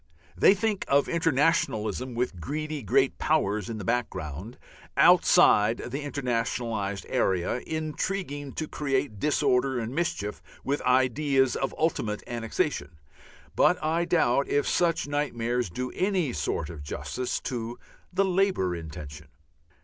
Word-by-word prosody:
They 195 - +6
think 210 0 -1
of 140 +1 +3
internationalism 130 - +1
with 120 -7 -2
greedy 155 - -3
Great 100 - +2
Powers 105 +3 +1
in 115 - -4
the 105 - -6
background 95 - -3 0.4
outside 105 +3 +6
the 135 +4 -5
internationalized 115 -7 -2
area, 95 +4 +1
intriguing 155 -2 -3
to 155 - -3
create 135 -7 -2
disorder 130 -2 +2
and 115 +1 -3
mischief 120 - -2 0.2
with 140 +2 -1
ideas 130 +1 +2
of 135 - -1
an - - -13
ultimate 115 -10 0
annexation. 115 - -2 0.6
But - - +4
I 165 +2 +1
doubt 140 -6 +2
if 145 - +1
such 170 -4 +1
nightmares 125 -6 -1
do 125 +9 -4
any 185 -8 0
sort 75 0 -2
of 80 -3 -9
justice 125 - -3
to 120 -1 -4 0.3
the 195 +2 +2
Labour 185 - +1
intention. 75 -2 -8
125 Hz, 125 wpm, -27 LUFS, 105-150 Hz, 0.6 s, They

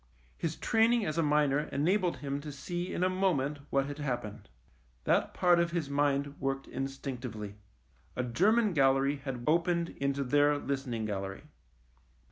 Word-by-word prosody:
His 165 -1 -3
training 225 0 +3
as 155 -1 -1
a - - +5
miner 150 -2 +3
enabled 175 +5 +1
him 140 +1 -2
to 150 0 -7
see 175 +6 -4
in 180 - -1
a - - +4
moment 170 -7 0
what 135 0 +2
had 145 +1 -6
happened. 120 -7 -4 0.5
That - - +1
part 175 -1 +4
of 170 0 +2
his 160 -5 -2
mind 140 0 0
worked 135 0 -2
instinctively. 125 -6 -5 0.6
A 125 - -1
German 205 - +3
gallery 135 -1 +3
had 135 -3 -5
opened 170 +1 +2
into 140 0 -1
their 145 +2 +3
listening 135 -6 -3
gallery. 100 0 -4
145 Hz, 150 wpm, -31 LUFS, 135-170 Hz, 0.6 s, a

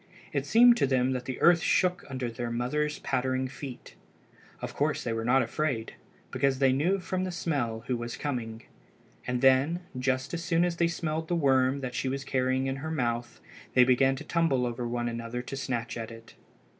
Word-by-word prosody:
It - - -1
seemed 240 +1 +7
to 140 - +2
them 130 -1 +2
that 125 -1 -3
the 130 -1 -5
earth 170 -1 +6
shook 180 +3 +2
under 130 -3 -3
the 120 +1 -4
mother's 145 +6 -1
pattering 130 +1 -1
feet. 135 -1 -9 0.7
Of - - -6
course - - 0
they 115 - -2
were 115 0 -2
not 130 +3 +4
afraid, 130 -8 -2 0.4
because 135 -1 +1
they 135 -1 +4
knew 170 +9 +2
from 185 +1 -2
the 185 - -2
smell 135 -10 -2
who 125 - -1
was 120 0 -5
coming. 115 -6 -4 0.6
And 125 -1 -1
then, 135 +6 +4
just 130 +2 -1
as 170 -1 -3
soon 170 -1 +2
as 175 -1 -2
they 170 - +3
smelled 160 -1 -3
the 175 - 0
worm 135 -3 +2
that 125 -2 -4
she 130 +2 -1
was 135 +1 -3
carrying 130 0 0
in 135 0 -2
her 155 +4 -5
mouth, 120 -6 -2 0.4
they 125 - +8
began 130 +1 +4
to - - -7
tumble 155 -7 +1
over 120 0 -3
one 120 0 -2
another 115 +1 -4
to 135 - -6
snatch 120 -3 -3
at 115 -1 -5
it. 115 0 -12
130 Hz, 200 wpm, -28 LUFS, 120-155 Hz, 0.7 s, they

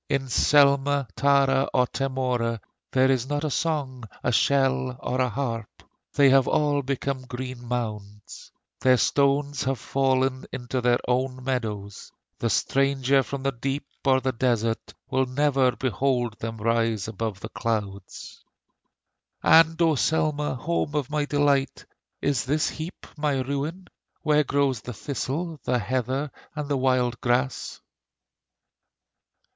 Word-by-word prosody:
In 135 -2 -1
Selma, 140 +1 +4
Tara, 140 -1 +3
or 125 -1 +4
Temora 125 -3 -1 0.3
There 130 0 +4
is 130 0 0
not 145 +1 -1
a 155 - -1
song, 135 -6 -2 0.2
a - - +1
shell, 130 0 +2
or 130 +1 -1
a 125 - +2
harp; 115 -3 -4 0.3
They 140 -2 +6
have 135 -1 +5
all 145 -1 +2
become 135 0 -2
green 125 -1 -6
mounds; 105 -4 -5 0.3
Their 130 -1 +4
stones 140 +1 +1
have 135 0 0
fallen 130 +1 0
into 125 0 -3
their 120 0 +3
own 130 +1 -1
meadows; 110 -6 -4 0.3
The - - 0
stranger 135 0 +2
from 135 +1 -6
the 135 - +1
deep 135 +3 -3 0.2
or 130 -1 +4
the 130 0 -1
desert 115 -2 -1 0.2
Will 130 0 +2
never 135 -1 +2
behold 125 -2 0
them 115 0 -5
rise 115 -2 0
above 110 -2 -4
the 110 - -6
clouds. 100 -5 -4 1.0
And 165 0 +6
O 165 -1 +4
Selma! 150 0 0
home 150 +1 -2
of 145 -2 -1
my 150 -1 0
delight, 145 -2 +1 0.4
Is 140 -3 +1
this 150 +4 +1
heap 160 +3 -7
my 145 -3 0
ruin, 140 +8 -3 0.4
Where 150 -1 +3
grows 140 -4 0
the 125 - -7
thistle, 150 +6 -4
the 125 - +1
heather, 130 +5 -2 0.2
and 150 -1 -4
the 140 -1 0
wild 130 -2 +1
grass? 125 +2 -1
130 Hz, 135 wpm, -25 LUFS, 125-140 Hz, 1.0 s, They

